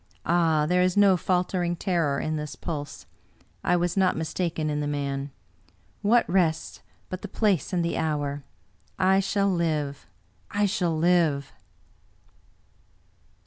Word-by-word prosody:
" - - -39
Ah, 165 -3 +3
there 180 +3 +2
is 185 +1 +1
no 200 -2 +6
faltering 180 0 0
terror 165 -6 0
in 155 - -2
this 150 -1 -5
pulse! 145 -4 -6 0.6
I 180 - +3
was 175 0 0
not 190 -2 +2
mistaken 160 0 -2
in 150 -1 -1
the 145 - -2
man. 140 -1 -3 0.7
What 230 +4 +3
rests, 170 -3 0 0.3
but 185 - -6
the 205 - -6
place 205 -4 0
and 175 -2 0
the 170 - -1
hour? 145 -3 -2 0.3
— - - -38 0.2
I 190 - +4
shall 195 +1 +1
live, 155 -5 -1 0.4
I 205 -1 +1
shall 180 -5 0
live!" 160 -4 +2
170 Hz, 145 wpm, -26 LUFS, 150-185 Hz, 0.7 s, no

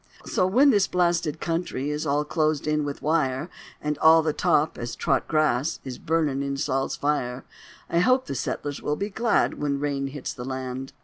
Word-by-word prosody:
So 185 - +1
when 265 +9 +5
this 200 -4 +3
blasted 170 -3 +1
country 165 -4 -2
Is 150 +1 -3
all 145 +1 +1
closed 155 -1 0
in 150 0 +1
with 145 -1 -5
wire, 150 0 0 0.3
And 150 -1 -3
all 160 0 +6
the 155 -1 0
top, 160 -3 +2
as 120 0 -4
trot - - 0
grass, 155 -2 +1
Is 130 -2 -7
burnin' 155 -4 0
in 140 0 -2
Sol's 135 0 -1
fire, 130 -3 -1 0.4
I 170 - +1
hope 255 +8 +3
the - - -4
settlers 140 +2 -3
will 150 - -1
be 200 +5 -4
glad 230 -4 +1
When 140 -1 0
rain 140 -1 -1
hits 135 -1 -5
the 125 - -7
land. 130 0 -5
150 Hz, 190 wpm, -25 LUFS, 135-165 Hz, 0.4 s, all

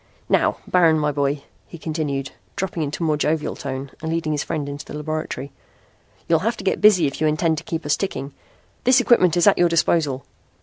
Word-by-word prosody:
"Now, - - +2
Baron, 165 -3 +4
my 150 -1 +1
boy," 140 0 -1 0.2
he 170 - -10
continued, 150 -4 -3 0.2
dropping 190 -3 -3
into 150 +3 -3
a - - +1
more 155 -1 +1
jovial 150 +1 0
tone 135 -1 -5
and 160 0 -3
leading 165 -2 -1
his 150 -1 -1
friend 155 -4 -3
into 145 +1 -6
the - - -9
laboratory, 150 -3 -4 0.8
"you'll 165 -1 +3
have 225 +5 -1
to - - -8
get 190 - 0
busy 195 -6 +6
if 140 +1 -3
you 155 - +3
intend 155 +1 +1
to - - -13
keep 165 -2 -4
us 145 - +2
ticking. 145 -8 -4 0.5
This 255 +1 +5
equipment 185 -9 +4
is 175 - +4
at 205 - +5
your 175 -1 +5
disposal." 155 -5 +1
155 Hz, 210 wpm, -22 LUFS, 145-170 Hz, 0.8 s, busy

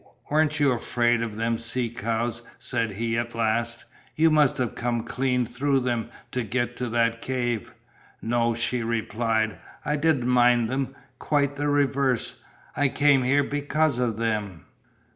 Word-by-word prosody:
"Weren't 155 0 +2
you 145 -2 +4
afraid 120 -1 +1
of 115 -3 -3
them 115 0 0
sea 120 +1 -1
cows?" 115 +1 -2 0.2
said 120 -3 -2
he 115 +3 -2
at 120 0 -4
last, 115 +1 -1 0.3
"you 160 +1 +4
must 150 -1 +4
have 125 -3 -1
come 120 -1 -2
clean 125 +1 0
through 135 +3 0
them 120 -3 -1 0.2
to 125 - -1
get 120 +2 -2
to 125 -1 -3
that 115 0 +1
cave." 120 -5 -2 0.4
"No," 115 0 +1
she 120 +1 -1
replied, 115 -1 -1 0.3
"I 150 - 0
didn't 145 -4 +2
mind 120 -2 +4
them, 135 0 -2 0.2
quite 145 -2 +1
the 145 +1 -1
reverse. 140 -3 +1 0.3
I 145 -1 +2
came 145 -1 +4
here 135 +3 +3
because 145 -1 0
of 115 -4 0
them." 105 -7 -2
120 Hz, 155 wpm, -25 LUFS, 115-135 Hz, 0.4 s, you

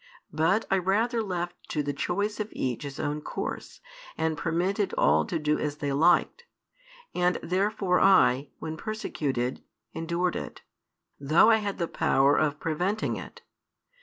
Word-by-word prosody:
But 165 +8 +2
I 190 - +4
rather 225 +6 +1
left 175 -4 -5
to 150 - -1
the 145 0 -2
choice 200 +9 -2
of 215 0 -3
each 125 -3 -2
his 140 -2 -7
own 150 0 -2
course, - - -6 0.4
and 160 0 0
permitted 180 +5 -1
all - - +4
to 170 - -2
do 150 -1 0
as 150 -1 -3
they 145 -2 -2
liked. 175 - +3 0.7
And 180 0 +1
therefore 190 0 +1
I, 140 -8 +4
when 160 0 -6
persecuted, 140 - -3 0.3
endured 170 +2 -1
it, - - -7 0.6
though 155 +10 +5
I 220 - +5
had 205 -2 -3
the 170 - -1
power 140 -1 +3
of 150 -1 +1
preventing 180 +7 -1
it. - - -10
170 Hz, 150 wpm, -27 LUFS, 150-195 Hz, 0.7 s, though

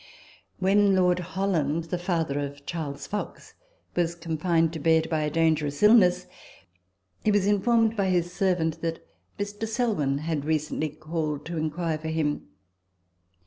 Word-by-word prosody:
When 195 +1 +3
Lord 180 -1 +3
Holland 170 -4 -1
(the 170 +2 -4
father 165 -5 -1
of 140 0 -6
Charles 150 -4 -5
Fox) 210 0 -6 0.4
was 170 -1 0
confined 165 0 0
to 160 - -4
bed 160 +1 +3
by 155 -1 +1
a 150 - 0
dangerous 155 -1 +1
illness, 210 -5 +6 1.0
he - - +2
was 205 -2 +3
informed 225 +2 +3
by 200 -3 +1
his 175 -1 0
servant 180 -5 0
that 165 -1 -3 0.3
Mr. 205 +2 -4
Selwyn 215 - 0
had 155 -1 -2
recently 155 0 -1
called 155 -1 -4
to 170 0 -5
inquire 160 +1 -2
for 160 - -6
him. 155 -2 -1
165 Hz, 145 wpm, -26 LUFS, 155-190 Hz, 1.0 s, illness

